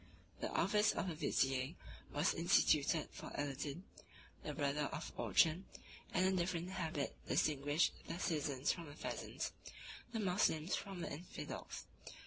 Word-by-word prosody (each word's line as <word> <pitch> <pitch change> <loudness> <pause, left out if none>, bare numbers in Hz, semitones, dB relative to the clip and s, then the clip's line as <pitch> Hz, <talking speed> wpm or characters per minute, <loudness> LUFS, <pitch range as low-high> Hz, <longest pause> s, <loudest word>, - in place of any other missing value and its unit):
The - - -1
office 210 +1 +4
of - - -1
vizier 135 -2 +1 0.4
was 150 +5 +2
instituted 160 -2 +4
for - - -7
Aladin, 145 +3 -3 0.6
the - - -4
brother 145 0 +1
of 160 +1 -5
Orchan; 165 +4 +3 0.5
411 - - -10
and 185 +1 +4
a 190 - +4
different 175 0 -1
habit 160 -6 -2
distinguished 145 +2 +3
the 165 - -3
citizens 145 -5 +1
from 170 -3 -5
the 145 - -9
peasants, - - -3 0.6
the 225 - -1
Moslems 180 -4 +2
from 195 -3 -5
the - - -3
infidels. 170 +5 -6
160 Hz, 135 wpm, -39 LUFS, 145-180 Hz, 0.6 s, office